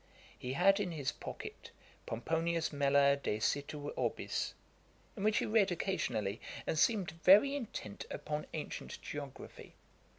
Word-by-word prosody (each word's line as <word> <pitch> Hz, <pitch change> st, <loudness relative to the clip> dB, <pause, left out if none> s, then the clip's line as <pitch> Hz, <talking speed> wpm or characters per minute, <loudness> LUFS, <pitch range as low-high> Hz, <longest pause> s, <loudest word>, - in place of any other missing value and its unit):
He 125 Hz, +1 st, -4 dB
had 195 Hz, +6 st, +5 dB
in 190 Hz, -4 st, -1 dB
his 140 Hz, -4 st, -1 dB
pocket -, -, -8 dB, 0.4 s
'Pomponius 165 Hz, +7 st, 0 dB
Mela 140 Hz, 0 st, +4 dB
de 105 Hz, -6 st, -1 dB
situ 145 Hz, +5 st, -1 dB
Orbis,' -, -, -2 dB, 0.6 s
in 205 Hz, -, -6 dB
which 215 Hz, 0 st, +3 dB
he -, -, +2 dB
read 210 Hz, -3 st, +3 dB
occasionally, 120 Hz, -, -1 dB, 0.2 s
and 160 Hz, -, 0 dB
seemed 205 Hz, -3 st, +3 dB
very 210 Hz, +9 st, +8 dB
intent 220 Hz, -, -6 dB
upon 150 Hz, 0 st, -4 dB
ancient -, -, -5 dB
geography. -, -, -8 dB
160 Hz, 130 wpm, -34 LUFS, 140-195 Hz, 0.6 s, very